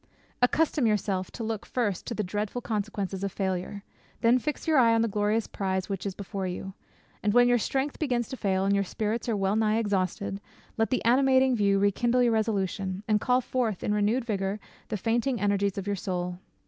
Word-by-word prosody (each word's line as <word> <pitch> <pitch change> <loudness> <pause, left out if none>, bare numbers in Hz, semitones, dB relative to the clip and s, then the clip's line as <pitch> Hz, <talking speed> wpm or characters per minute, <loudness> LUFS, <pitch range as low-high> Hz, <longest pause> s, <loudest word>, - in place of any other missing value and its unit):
Accustom 290 0 +3
yourself 195 -3 0
to 235 - -7
look 220 -2 -3
first 210 -7 -2
to 235 - -3
the 210 - -1
dreadful 205 +5 -3
consequences 205 -4 -3
of 200 - -1
failure; 190 +1 -3 0.4
then 240 +2 +5
fix 300 +5 -4
your 310 -3 +5
eye 230 -2 +5
on 225 - +3
the - - +1
glorious 210 +1 0
prize 190 -1 -2
which 195 0 -3
is 190 - -4
before 195 -1 -4
you; 190 +2 -5 0.5
and 205 +1 +1
when 245 0 +7
your 245 0 +4
strength 270 +5 -1
begins 245 -6 0
to - - -4
fail, 190 -5 0
and 200 - +2
your 200 0 +2
spirits 220 +5 -2
are 220 - +1
well 195 +1 +1
nigh 220 0 +2
exhausted, 200 -2 -1 0.3
let 225 0 +1
the 255 - -1
animating 260 +1 +4
view 200 -3 +3
rekindle 235 +5 +2
your 240 - +3
resolution, 195 -3 -1
and 210 -1 +2
call 250 0 +3
forth 235 -6 -2
in 210 - 0
renewed 210 +4 +1
vigour 200 -2 -2 0.3
the 215 - -2
fainting 235 +4 0
energies 200 -1 +1
of 195 - -3
your 205 0 -1
soul." 180 -2 -3
210 Hz, 200 wpm, -27 LUFS, 195-235 Hz, 0.5 s, when